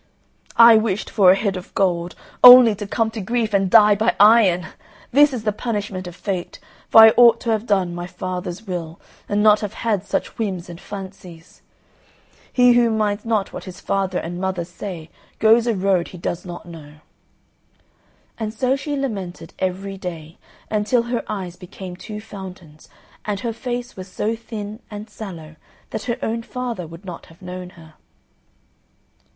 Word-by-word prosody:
I 230 -1 +9
wished 215 -2 -2
for 195 -4 +5
a 185 - +7
head 200 -1 -1
of 185 0 -9
gold, 175 -2 0 0.3
only 250 -2 +10
to 205 0 -7
come 225 +1 -1
to 220 - -6
grief 225 +1 -1
and 195 -1 +2
die 210 0 +7
by 220 +3 +1
iron! 205 -5 +5 0.5
This 290 +3 +5
is 245 -5 -5
the 215 - +1
punishment 205 -4 -4
of 175 - -9
Fate, 185 -3 -5 0.3
for 225 - +9
I 220 0 +8
ought 240 -1 +7
to 230 - -1
have 220 +1 -1
done 190 -4 +1
my 175 0 -6
father's 185 +2 -6
will, 170 -4 -6 0.3
and 205 0 +1
not 210 -1 +6
have 210 -2 -5
had 215 -5 -1
such 195 - -4
whims 190 -6 -3
and 170 - -11
fancies. 190 -4 -10 0.9
He 245 -1 +5
who 240 -1 +4
minds 210 -1 -1
not 220 -4 -1
what - - -7
his 180 -2 -10
father 190 -2 -1
and 175 +2 -5
mother 190 -2 -2
say 175 -2 -8 0.3
goes 225 +2 +4
a 230 - +1
road 185 -2 +1
he 180 - -11
does 175 +1 -4
not 175 0 -8
know." 155 -3 -12 1.4
And 220 0 -4
so 260 +2 +1
she 290 +1 -4
lamented 195 -11 -5
every 190 +1 -3
day, 165 -3 -8 0.3
until 215 +3 +1
her 240 0 -3
eyes 185 -4 -5
became 180 0 -9
two 210 +4 -8
fountains, 185 -7 -11 0.4
and 205 -1 -3
her 230 -1 -3
face 245 +1 -5
was 185 0 -8
so 210 +4 -2
thin 215 -2 -8
and 210 0 -9
sallow, 165 -8 -9 0.3
that 210 - -5
her 240 -1 -2
own 230 +1 -2
father 235 -7 -5
would 165 +4 -13
not 175 -3 -9
have 165 +3 -19
known 180 0 -7
her. 160 -1 -15
200 Hz, 175 wpm, -21 LUFS, 180-225 Hz, 1.4 s, only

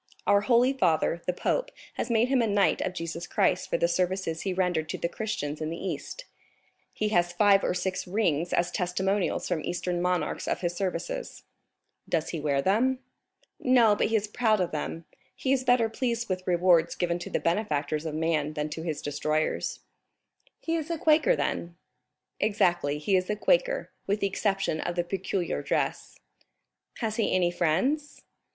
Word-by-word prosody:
Our 200 0 +4
holy 245 +4 +4
father, 170 - +1
the - - +3
pope, - - -1 0.2
has - - -3
made 235 +1 +3
him 265 -2 +3
a 230 - +2
knight 200 -2 +2
of 185 - -2
Jesus 170 0 -5
Christ - - +1
for - - +1
the 170 - +2
services 180 -1 -1
he 195 - -2
rendered 180 -4 0
to - - -3
the - - -1
Christians 165 -7 -4
in 155 - -2
the 165 - -4
East; 190 - -5 0.7
he 215 - -1
has 175 -4 +2
five 200 +2 +4
or - - 0
six 185 +1 -2
rings 175 -4 0
as 175 +1 +1
testimonials 190 +1 0
from 175 -4 -1
Eastern 175 0 -2
monarchs 180 0 -1
of - - -1
his 175 -1 -1
services." - - -4 0.7
"Does 165 -1 0
he 165 - -3
wear 140 -2 0
them?" 240 +7 +2 0.6
"No, 240 -5 +5
but - - +1
he 225 - 0
is 215 -1 +1
proud 215 -1 +2
of 180 -2 0
them; 155 +2 -4 0.3
he 265 - 0
is 260 -1 +1
better 245 -2 +4
pleased 235 0 -2
with 185 -1 -3
rewards 175 -2 +3
given 175 -1 -1
to 175 - -7
the - - 0
benefactors 155 -5 -1
of 155 - -4
man 155 -2 0
than 150 0 -2
to 155 +2 -5
his 160 -3 -4
destroyers." 155 +2 -1 0.8
"He 330 - -1
is 315 0 -4
a 335 - -1
Quaker 315 +11 +4
then?" 170 0 -2 0.6
"Exactly, 175 -8 +1
he 155 +6 +1
is 185 0 +1
a 210 - +1
Quaker, - - +1 0.2
with 200 +1 +1
the - - +2
exception 195 -4 -1
of 175 - -3
the 175 - +1
peculiar 190 0 -2
dress." - - -2 0.8
"Has 220 -1 -1
he 225 - +1
any 175 -2 +2
friends?" 195 - 0
185 Hz, 180 wpm, -27 LUFS, 170-220 Hz, 0.8 s, No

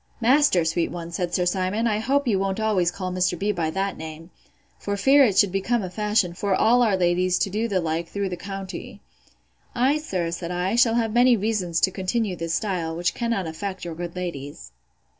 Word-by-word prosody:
Master, 250 - +4
sweet 165 +1 0
one! 170 -1 -7
said 175 +1 -2
Sir 180 0 0
Simon, 185 +5 0
I 215 -2 +1
hope 275 +4 0
you 200 -5 +2
won't 195 +1 -1
always 205 -5 +2
call 185 0 -5
Mr. 180 -1 0
B—— 205 +4 0
by 170 -5 -1
that 195 +4 -2
name, 160 +2 -9 0.5
for 205 0 -3
fear 275 +7 +5
it 210 -7 +2
should 200 -3 +5
become 205 +4 0
a 185 - -5
fashion 210 -3 0
for 195 +2 0
all 240 +5 +4
our 215 -5 +3
ladies 180 0 +2
to 195 - -1
do 220 +4 -1
the 195 -4 0
like 165 0 -2
through 200 0 -2
the 180 - -3
county. 195 +1 -7 0.8
I, 265 +5 +2
sir, 180 - -3
said 170 0 -5
I, 180 +4 -1
shall 235 -1 +4
have 225 -2 0
many 245 0 +5
reasons 195 -6 -1
to 190 - +3
continue 190 +1 -1
this 165 -1 -2
style, 175 -6 -2
which 170 0 0
cannot 230 -6 -1
affect 185 +4 -5
your 170 - -5
good 170 +1 -6
ladies. 145 - -6
190 Hz, 210 wpm, -24 LUFS, 175-220 Hz, 0.8 s, fear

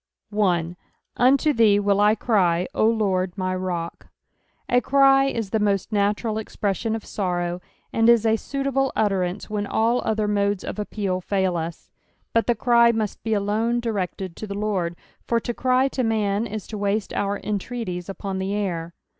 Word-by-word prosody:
1. 180 -5 +1 0.2
" - - -34
Unto 275 +4 +4
thee 215 -4 +4
will 200 0 +2
I 210 +1 +4
ery, 180 -6 +3
0 215 - +3
Lord 190 -4 0
my 185 -1 -1
rod." 175 -2 -4 0.3
— - - -46 0.3
A 245 0 +3
cry 270 +1 +5
is 225 -7 -2
the 220 - +1 0.3
natural 210 +2 0
expreSBiun 220 0 -2
of 225 - -6
BorroiT, 175 -2 -2 0.3
and 225 0 +4
is 235 -2 +5
a 220 0 +4
suitable 275 +2 -1
utterance 195 -3 0
when 210 -1 -3
all 230 +4 +1
other 215 -1 0
modea 200 -1 0
of - - -5
appeal 200 -3 -2
tail 190 -1 0
us; 165 0 -5 0.4
but 230 - +2
the 240 - +3
cry 235 +1 +4
muat 220 -3 -2
be 220 -1 0
alone 215 +4 0
directed 190 -5 -3
to 215 - -6
the 200 0 -5
Lord, 190 -5 -1 0.3
for 235 - +2
to 240 - -4
cry 255 +2 +2
to 265 - -2
man 220 -2 0
is 215 -2 -6
to 215 - -7
waste 205 +1 -1
our 200 0 -1
entreaties 200 -3 -4
upon 195 0 -4
the 195 +2 -2
air. 175 -5 -3
210 Hz, 175 wpm, -23 LUFS, 190-230 Hz, 0.4 s, cry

